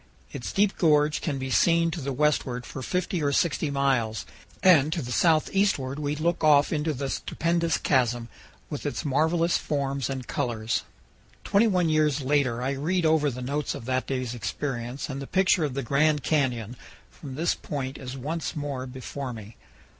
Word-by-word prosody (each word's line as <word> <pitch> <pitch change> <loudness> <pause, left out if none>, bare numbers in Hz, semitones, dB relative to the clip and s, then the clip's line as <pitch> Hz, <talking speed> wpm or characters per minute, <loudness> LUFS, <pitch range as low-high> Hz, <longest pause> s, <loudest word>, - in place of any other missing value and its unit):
Its - - -5
deep 205 0 +2
gorge 150 -2 +3
can 145 -4 -2
be 130 0 -4
seen 170 +2 +3
to 165 -1 -4
the 140 +1 -3
westward 130 -3 0
for 135 - -7
50 180 +4 -1
or 145 -1 +1
60 155 +1 +1
miles, 130 -7 0 0.4
and 155 -5 +6
to 165 - -1
the 125 -5 -5
southeastward 155 -3 +2
we 145 0 -1
look 165 +2 -1
off 150 -1 +5
into 155 +1 0
the 140 -1 -3
stupendous 170 +4 0
chasm, 120 -4 +1 0.4
with - - -6
its - - -3
marvelous 160 +4 +2
forms 140 -2 -2
and 130 -2 -4
colors. 115 -5 -1 0.6
Twenty 205 +3 +3
one 180 -5 +2
years 155 -2 +2
later 130 -3 +1
I 135 - 0
read 165 +6 0
over 155 -2 +3
the 125 -1 -6
notes 145 +3 -2
of 115 - -8
that 130 +1 -1
day's 130 -3 -2
experience 125 +1 -4
and 135 -1 -5
the 135 - -6
picture 185 -3 +3
of 135 -3 -4
the 140 - -2
Grand 150 +3 +2
Canyon 125 -6 0 0.3
from 135 -4 -9
this 165 +4 +1
point 135 -2 -5
is 130 0 -7
once 155 +6 -4
more 140 -3 -4
before 130 +1 -6
me. 110 -1 -10
140 Hz, 175 wpm, -26 LUFS, 130-160 Hz, 0.6 s, and